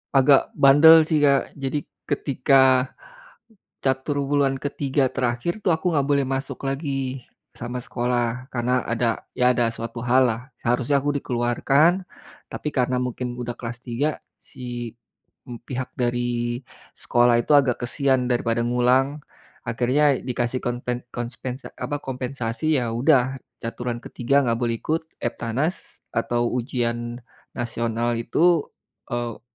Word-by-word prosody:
agak 135 +1 +5
bandel 155 +4 +8
sih, 155 -2 +2
Kak. 140 -1 +2
Jadi 140 +1 -3 0.2
ketika, 130 -2 +3 0.9
catur 140 +2 0
wulan 140 -1 +2
ke-3 140 -1 0
terakhir 125 - -1
tuh, 185 - +2
aku 165 +2 -1
gak 140 - +1
boleh 140 -1 +2
masuk 135 +1 -3
lagi 135 -2 -2 0.3
sama 120 +1 -5
sekolah, 120 0 -1
karena 125 +1 +1
ada 115 -1 0 0.2
ya, 125 0 +5
ada 120 -1 +2
suatu 115 +1 -6
hal 125 +2 +4
lah. 115 -1 -1 0.2
Seharusnya 125 +4 +2
aku 145 - 0
dikeluarkan, 135 +9 +2 0.5
tapi 150 - -4
karena 125 -1 +1
mungkin 125 0 -3
udah 120 -1 -4
kelas 120 0 -6
3, 135 +5 -1 0.2
si, 120 -2 -7 0.5
mmm, 120 -2 -8
pihak 130 0 -4
dari 120 -1 -1 0.4
sekolah 120 0 +3
itu 135 - 0
agak 135 -5 +3
kasihan 130 -1 +1
daripada 120 -1 +1
ngulang, 125 +4 +2 0.5
akhirnya 130 +5 +2
dikasih 125 0 -2
konpen 120 0 -3
konspens 125 +2 -5
eee, - - -10
apa, 145 -1 -3
kompensasi, 130 +2 -1
ya 120 -2 -2
udah, 130 0 +3 0.3
caturan 120 +1 -4
ke-3 140 +4 +1
gak 115 -1 +1
boleh 120 -1 0
ikut 160 +1 -1 0.2
EBTANAS 120 +9 -3
atau 120 +1 0
ujian 120 -1 -2 0.4
nasional 120 0 -1
itu, 160 +7 +2 0.5
eee 120 -2 -3
125 Hz, 130 wpm, -23 LUFS, 120-140 Hz, 0.9 s, bandel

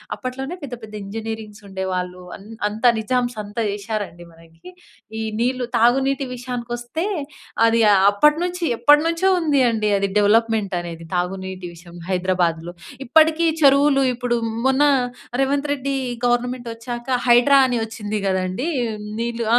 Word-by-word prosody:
అప్పట్లోనే 265 +7 -5
పెద్ద, 255 -3 -6
పెద్ద 215 -1 -11
ఇంజనీరింగ్స్ 220 0 -6
ఉండేవాళ్ళు. 185 -1 -4 0.2
అన్ 195 - -16 0.2
అంతా 220 +4 +2
నిజామ్స్ 245 +1 -1
అంతా 205 +3 -5
చేశారండి 200 -4 -5
మనకి. 165 - -16 0.5
ఈ - - -2 0.2
నీళ్లు, 250 +1 0
తాగునీటి 270 +3 +2
విషయానికొస్తే, 245 +5 -4 0.6
అది 230 0 +3
ఆహ్, 190 0 +4
అప్పటినుంచి 335 - +2 0.2
ఎప్పటినుంచో 330 +6 +4
ఉంది 295 -5 +2
అండి 215 -2 0
అది 200 0 0
డెవలప్మెంట్ 215 -1 +2
అనేది, 165 -1 -8
తాగునీటి 185 +1 -3
విషయం, 170 +1 -14
హైదరాబాద్‍లో. 175 -2 0 0.3
ఇప్పటికి 320 +4 +4 0.2
చెరువులు 275 0 +5
ఇప్పుడు, 245 -1 -1 0.3
మొన్న 265 +2 +3 0.6
రేవంత్ 280 +2 +1
రెడ్డి 275 -1 -2 0.3
గవర్నమెంటొచ్చాక, 240 0 -2 0.2
హైడ్రా 245 +3 +6
అని 245 -2 0
వచ్చింది 215 -1 -4
కదండీ! 190 +6 -1 0.5
నీళ్లు 235 0 -2
235 Hz, 120 wpm, -21 LUFS, 195-270 Hz, 0.6 s, హైడ్రా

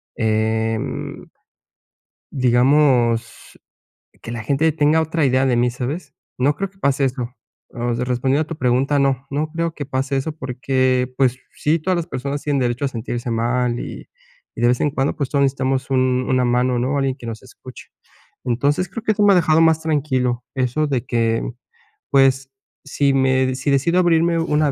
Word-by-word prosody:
em 110 0 -2 1.1
digamos, 125 -2 +2 0.6
que - - -8
la 120 -1 -5
gente 145 +6 +2
tenga 150 +1 +3
otra 160 -1 0
idea 130 0 +2
de 125 -2 +2
mí, 120 +1 +2
¿sabes? 140 +5 -5 0.2
No 140 +4 +2
creo 195 +6 -3
que 190 - -29
pase 140 -4 +1
eso. 125 -1 -4 0.4
Osea, 120 0 -2
respondiendo 130 +4 +1
a - - -6
tu 165 - -6
pregunta, 130 +3 +1
no 135 -1 +1
no 150 +3 -2
creo 165 +1 -2
que 145 -3 -6
pase 135 0 -1
eso, 155 +4 -3
porque, 130 -1 0
pues 130 -2 +2 0.2
sí, 155 +3 +1
todas 185 +3 -1
las 170 -1 -2
personas 140 -2 -4
tienen 145 -2 0
derecho 120 +2 -1
a - - +2
sentirse 120 0 -5
mal. 120 +1 0
Y - - -8 0.5
y - - -8
de 120 - +4
vez 125 0 +1
en 150 - +2
cuando, 135 0 -1
pues, 140 -4 -3
todos 140 -1 +2
necesitamos 135 -1 -1
un 130 -1 +1
una 130 -1 +2
mano, 125 +1 +1
¿no? 130 +4 0
Alguien 135 -1 0
que 120 - -13
nos 110 -1 -6
escuche. - - -13 0.6
Entonces, 140 +8 0
creo 220 +4 -6
que 220 - +1
esto 210 - 0
me 205 - +6
ha 190 - +5
dejado 160 -2 +3
más 160 -1 +4
tranquilo. 130 -6 0
Eso 130 +3 0
de 130 -3 -2
que, 115 -2 0 0.7
pues, 135 -1 +3 0.4
si 140 0 +1
me 130 -1 +2
si 135 +2 -1
decido 155 +7 +2
abrirme 170 -1 +3
una 150 -2 +1
135 Hz, 180 wpm, -20 LUFS, 125-150 Hz, 1.1 s, me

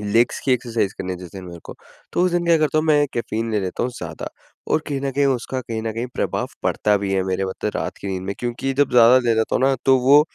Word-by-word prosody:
legs 110 +3 +1
की 135 - +3
exercise 115 -5 -1
करनी 90 -1 -3
जिस 90 -2 -10
दिन 95 -1 -8
मेरे 85 -1 -9
को - - -9 0.4
तो 175 - +1
उस 180 - +3
दिन 175 0 +1
क्या 170 -1 +5
करता 155 0 +1
हूँ 155 - +1
मैं 145 -1 +4
कैफ़ीन 115 -1 -2
ले 105 -2 0
लेता 95 -1 -3
हूँ 125 - -1
ज़्यादा - - -6 0.4
और - - +3
कहीं 140 -2 -2
न 140 0 -1
कहीं 140 +1 +2
उसका 130 0 -1
कहीं 115 -2 -5
न 110 -1 -2
कहीं 115 +3 -3
प्रभाव - - -1
पड़ता 105 -1 +2
भी 95 - -1
है 95 -1 +2
मेरे 95 +1 -1
मतलब 95 - -3
रात - - -3
की 100 - -5
नींद 95 -1 -3
में 100 +1 -4
क्योंकि 125 +3 -2
जब 145 0 +2
ज़्यादा 125 +1 +7
ले 120 -2 +1
लेता 110 0 0
हूँ - - -1
ना 135 0 +4
तो 135 0 +6
वो 140 +4 +7
120 Hz, 270 wpm, -21 LUFS, 100-135 Hz, 0.4 s, ज़्यादा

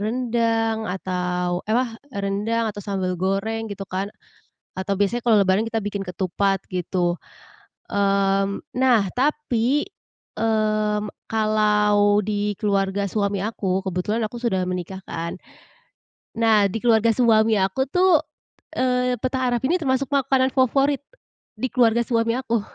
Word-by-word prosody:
rendang 225 -1 0
atau 180 -1 -2
ewah 235 +1 +1 0.2
rendang 210 +1 -1
atau 205 - -8
sambal 190 -2 -2
goreng 220 +4 -1
gitu 200 -1 -6
kan, 195 +1 -3 0.6
atau 190 +1 -2
biasanya 205 +5 +1
kalau 230 -2 +3
lebaran 195 +4 +2
kita 225 -2 -2
bikin 205 -1 -3
ketupat, 195 +1 -1
gitu. 180 -1 0 0.8
Mmm, 195 0 +1
nah 255 -3 +4 0.2
tapi, 280 -1 +1 0.6
mmm, 215 -1 +1 0.2
kalau 210 -1 +3
di 205 -1 -1
keluarga 200 -1 0
suami 200 0 -1
aku, 195 -3 -2
kebetulan 190 +5 -1
aku 215 +3 -5
sudah 190 -7 0
menikah 180 +1 -4
kan, 165 0 -4 1.0
nah 220 -3 +4
di 195 - -3
keluarga 230 -1 +4
suami 225 -2 +4
aku 195 +6 0
tuh, 360 0 +4 0.6
eee, 250 -1 +1
petah 260 0 -1
arab 240 -1 0
ini 325 +7 +2
termasuk 265 -1 +1
makanan 265 -1 +2
favorit, 275 +2 +2 0.6
di 260 - -1
keluarga 235 -2 +4
suami 230 -1 +1
aku. 235 -3 -1
215 Hz, 125 wpm, -23 LUFS, 195-235 Hz, 1.0 s, nah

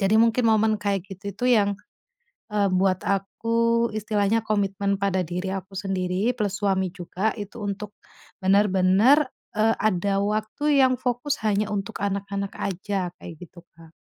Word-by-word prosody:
Jadi 195 +2 +2
mungkin 230 +1 +3
momen 220 0 +4
kayak 200 -3 -1
gitu 195 +2 -10
itu 245 - -4
yang, 200 0 +2 0.8
eee, 205 -1 +2
buat 185 0 +2
aku 230 +4 +1
istilahnya 215 +1 +1
komitmen 200 -1 0
pada 190 -2 0
diri 180 +3 -4
aku 195 0 -7
sendiri, 190 +4 -1
plus 205 -3 -1
suami 190 -2 +1
juga, 185 +3 -2
itu 205 +3 -7
untuk 205 +1 -5 0.5
bener-bener, 200 +8 +4 0.3
eee, 220 +1 +3
ada 200 -1 +1
waktu 215 +8 +1
yang 255 -1 +4
fokus 250 +4 -1
hanya 210 0 +1
untuk 205 +1 -4
anak-anak 200 0 -2
aja, 190 -1 -2
kayak 165 - -9
gitu, 175 +1 -16
Kak. 165 0 -17
200 Hz, 145 wpm, -24 LUFS, 190-220 Hz, 0.8 s, momen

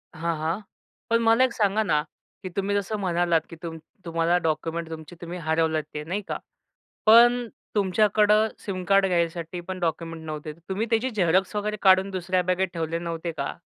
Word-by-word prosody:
हां, 165 +1 -1
हां. 160 +5 -1 0.5
पण 230 0 +3
मला 230 +2 +5
एक 255 -2 +1
सांगा 210 0 +2
ना? 150 -7 +2 0.4
की 185 - -4
तुम्ही 200 0 0
जसं 205 +2 -1
म्हणालात 175 -3 +2
की - - -9
तुम 165 -1 -5 0.3
तुम्हाला 165 +1 +2
डॉक्युमेंट 165 0 -2
तुमचे 160 +1 -8
तुम्ही 170 +1 -6
हरवलेत 160 -1 +1
ते 150 0 -4
नाही 185 +6 -3
का? - - -2 0.7
पण 240 +2 +6 0.3
तुमच्याकडं 210 +2 +3
सिम 185 -3 -5
कार्ड 195 +1 +4
घ्यायसाठी 170 -1 -1
पण 185 0 -4
डॉक्युमेंट 165 -1 -3
नव्हते. 155 0 -5 0.2
तुम्ही 200 +4 -1
त्याची 230 +3 +1
झेरॉक्स 190 -1 +1
वगैरे 210 +1 -1
काढून 190 0 +5
दुसऱ्या 185 0 0
बॅगेत 185 +1 0
ठेवले 165 0 -2
नव्हते 170 0 -4
का? 140 -3 -4
180 Hz, 170 wpm, -25 LUFS, 165-205 Hz, 0.7 s, पण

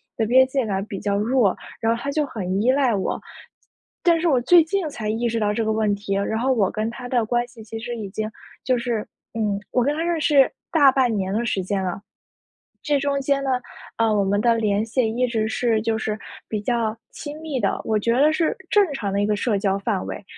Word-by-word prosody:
的 225 - 0
边 260 +3 +6
界 265 0 0
感 195 0 -2
比 195 -3 -6
较 200 -1 0
弱， 220 -1 +2 0.3
然 225 - +2
后 - - -6
他 280 - -2
就 300 +1 +1
很 195 -6 -2
依 250 +4 +4
赖 265 -3 +2
我。 190 - -2 0.8
但 335 -2 +4
是 345 - +1
我 270 -6 +4
最 340 +7 +6
近 350 +1 -1
才 215 -6 -4
意 230 +2 0
识 230 0 -1
到 210 -1 +1
这 225 +1 -1
个 220 - +1
问 215 -1 +1
题， 200 0 -4
然 200 +3 -1
后 260 +2 +2
我 200 -6 +2
跟 215 +1 -2
他 245 +1 -8
的 240 -3 +1
关 240 +2 0
系 240 -2 -13
其 225 +1 -7
实 240 +1 -5
已 215 -3 -5
经 215 +2 -3 0.3
就 255 -1 +2
是 235 -3 -1 0.3
嗯， 210 -3 -1
我 250 - +2
跟 290 +4 +1
他 325 - -1
认 340 -1 0
识 285 -3 +4 0.2
大 285 -5 +6
半 260 -3 +2
年 190 -2 -1
的 230 +3 0
时 195 -4 -1
间 195 +1 -1
了。 185 +1 -3 0.8
这 290 -2 +2
中 280 0 0
间 275 0 +1
呢， 270 - -1 0.5
呃， 230 - +3
我 205 -1 +2
们 200 +1 +1
的 235 0 +4
联 210 -1 +1
系 230 +1 +1
一 250 - +2
直 220 -2 0
是 225 -1 +1
就 220 0 0
是 220 -1 -3 0.3
比 215 -2 -2
较 225 -1 0 0.2
亲 295 -1 -7
密 305 -5 -3
的， - - 0
我 215 -1 +1
觉 230 +3 +1
得 285 +5 +4
是 325 -1 +1
正 415 -1 +5
常 205 -7 -3
的 200 - +1
一 - - +2
个 210 - +2
社 210 0 0
交 195 -1 +1
范 200 -2 -1
围。 - - -6
230 Hz, 260 characters per minute, -23 LUFS, 210-265 Hz, 0.8 s, 边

